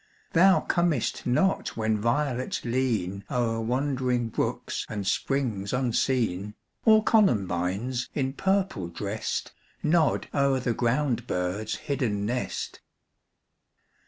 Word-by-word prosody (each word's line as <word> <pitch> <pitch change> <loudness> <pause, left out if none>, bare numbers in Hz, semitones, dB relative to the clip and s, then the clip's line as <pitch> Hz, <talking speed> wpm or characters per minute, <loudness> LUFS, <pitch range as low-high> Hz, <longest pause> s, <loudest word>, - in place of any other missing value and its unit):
Thou 185 +3 +6
comest 170 -11 0
not 190 +7 +1
when 110 -1 +1
violets 130 +2 -1
lean 110 -6 -1
O'er 115 -2 0
wandering 125 -1 0
brooks - - -2
and 105 -2 -4
springs 115 -4 -1
unseen, 115 -5 0 0.3
Or 220 -1 +6
columbines, 115 - +1
in 135 -2 0
purple 190 - 0
dressed, 100 +5 -3 0.3
Nod 155 -1 +2
o'er 140 -2 +2
the 125 -2 0
ground 120 0 0
bird's 90 +4 -2
hidden 115 -8 -1
nest. 125 +3 -3
125 Hz, 100 wpm, -27 LUFS, 105-140 Hz, 0.3 s, Thou